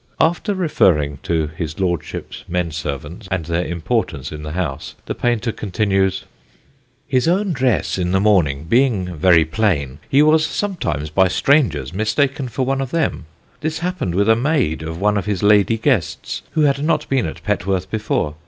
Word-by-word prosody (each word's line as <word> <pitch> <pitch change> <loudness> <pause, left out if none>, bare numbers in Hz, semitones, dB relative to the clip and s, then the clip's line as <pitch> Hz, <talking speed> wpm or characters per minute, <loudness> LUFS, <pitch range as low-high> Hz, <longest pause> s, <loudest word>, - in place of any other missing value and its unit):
After 175 +5 +1
referring 75 - +2
to 80 -2 0
his 80 0 -5
Lordship's 85 -4 -3
men 90 -1 -1
servants 75 +6 -5
and 90 -4 -2
their 85 +1 -1
importance 85 - -2
in 75 -1 -7
the 75 0 -6
house, 80 -5 -4
the - - -3
painter 120 -1 0
continues: 95 -2 0 0.8
"His 130 0 +1
own 190 +2 +1
dress, 125 -7 0
in 90 -1 0
the 95 - +3
morning, 85 -9 +2
being 100 -3 +1
very 85 0 +5
plain, 80 -7 -1
he 140 +2 +5
was 155 +1 +4
sometimes 155 - -2
by 95 +3 +4
strangers 90 - +2
mistaken 135 - 0
for 130 +3 -2
one 135 +1 0
of 135 - -3
them. 160 - -1 0.3
This 155 +1 -2
happened 180 - -2
with 100 +2 +2
a 115 - +6
maid 125 - 0
of 80 +1 -5
one 105 +1 +2
of 100 - -3
his 100 -3 -1
lady 105 +2 +4
guests, 115 - -1
who 155 - +1
had 140 -1 +2
not 160 - +1
been 135 -3 +1
at - - -8
Petworth 95 -2 -1
before. 105 -8 -1
100 Hz, 170 wpm, -19 LUFS, 85-135 Hz, 0.8 s, a